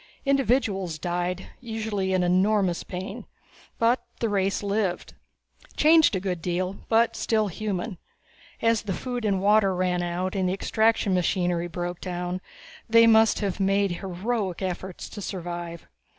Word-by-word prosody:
Individuals 240 - +1
died, 175 +2 -3
usually 220 -5 -3
in 185 -1 +2
enormous 185 0 +2
pain, 185 +1 -6 0.5
but 235 +2 +2 0.2
the 230 - 0
race 195 -1 0
lived. 200 -3 -1 0.6
Changed 315 -6 +5
a - - 0
good 180 -3 -3
deal, 180 +3 -2
but 230 +1 +3
still 215 -2 +1
human. 200 0 -4 0.6
As 230 -1 +3
the 200 -3 -3
water 245 +1 -3
and 195 -2 +2
food 200 -1 +3
ran 180 -1 +1
out 175 +2 -2
and 185 -2 +1
the - - 0
extraction 220 0 +1
machinery 175 -1 +1
broke 175 0 -5
down, 180 0 -3 0.5
they 230 0 +7
must 220 -1 +5
have 200 -2 -2
made 195 0 +2
heroic 195 0 -2
efforts 185 0 -4
to 205 - -8
survive. 175 -3 -6
190 Hz, 140 wpm, -26 LUFS, 180-220 Hz, 0.6 s, they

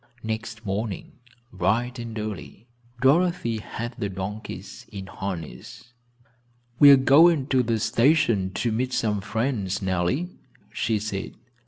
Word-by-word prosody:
Next 110 0 -5
morning, 100 +1 -3 0.4
bright 115 +7 0
and 115 -1 -6
early, 105 0 -6 0.4
Dorothy 140 -5 +2
had 115 +3 -6
the 100 - -1
donkeys 95 0 -7
in 100 -2 -7
harness. 95 - -7 0.9
"We 145 - +9
are 140 - +11
going 145 +2 +5
to 130 -1 +3
the 115 -2 0
station 115 -5 +2
to 120 - 0
meet 125 +3 -1
some 105 -3 0
friends, 105 -3 -1
Nellie," 95 - 0 0.4
she 115 -1 0
said. 100 -2 -4
110 Hz, 125 wpm, -25 LUFS, 100-125 Hz, 0.9 s, are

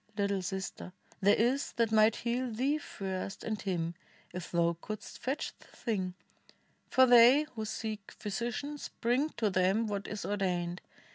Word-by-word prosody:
little 200 -1 +1
sister, 190 0 -5 0.3
there 200 +1 +6
is 255 +5 +1
that 230 -2 +1
might 215 0 +5
heal 245 +1 -1
Thee 270 +7 +1
first, 195 -6 -5
and 215 -2 -3
him, 170 -4 -1 0.4
if 180 -1 -5
thou 170 0 +2
couldst 215 -1 -7
fetch 270 +4 -2
the - - -18
thing; 190 -6 -3 0.7
For 260 -1 +6
they 245 +4 +8
who 220 -2 -4
seek 215 -1 -4
physicians 240 +8 -4
bring 250 +6 +2
to 215 -3 +1
them 185 +5 +2
What 200 -2 -3
is 210 - -5
ordained. 180 -3 -1
215 Hz, 150 wpm, -32 LUFS, 190-240 Hz, 0.7 s, they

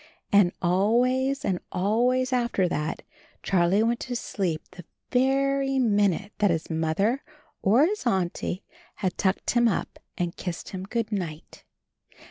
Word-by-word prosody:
And 200 -3 +5
always 250 +9 +2
and 185 -2 0
always 245 +7 +1
after 235 -7 +1
that 150 -2 -3 0.4
Charlie 190 +3 +3
went 235 +1 +1
to 250 -1 -4
sleep 180 -8 -2
the 180 - -11 0.3
very 270 +1 +2
minute 205 -4 +2
that 205 -1 +4
his 165 -1 -1
Mother 165 - 0 0.4
or 230 +9 +5
his 410 -6 -2
Auntie 185 -1 -1 0.3
had 185 -2 -2
tucked 190 -1 0
him 240 -1 +4
up 205 - -2 0.2
and 175 -1 -2
kissed 175 -3 -5
him 185 -1 -6
"Good 230 -2 -2
night." 170 -6 -5
205 Hz, 135 wpm, -26 LUFS, 180-250 Hz, 0.4 s, And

